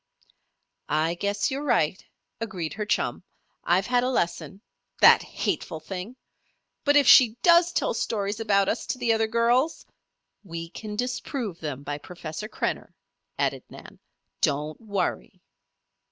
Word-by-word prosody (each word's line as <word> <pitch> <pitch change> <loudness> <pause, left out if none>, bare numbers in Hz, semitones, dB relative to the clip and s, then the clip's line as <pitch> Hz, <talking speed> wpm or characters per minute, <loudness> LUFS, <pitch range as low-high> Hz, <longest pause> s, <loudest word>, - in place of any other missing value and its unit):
"I 155 +2 +1
guess 205 +6 -1
you're 275 +2 -3
right," 195 - +1 0.4
agreed 190 -8 -4
her 210 0 -4
chum. - - -1 0.4
"I've 185 +3 +2
had 245 +1 +2
a 255 - +1
lesson. 190 -2 -2 0.4
That - - +8
hateful 160 -3 -3
thing! 185 +8 -7 0.7
But 290 0 +3
if 290 -1 +6
she 245 -2 +7
does 345 0 +6
tell - - 0
stories 205 -1 -2
about 200 -3 +2
us 230 - -2
to - - -2
the 240 -2 +2
other 225 0 +1
girls 235 +6 +1 0.3
" - - -55
"We 165 0 -5
can 210 +1 -7
disprove 245 - -3
them 145 -3 -5
by 145 0 -4
Professor 175 +4 -7
Krenner," - - -3 0.4
added - - 0
Nan. - - -13 0.4
"Don't 150 +2 -1
worry." 200 -3 -3
210 Hz, 140 wpm, -26 LUFS, 170-240 Hz, 0.7 s, That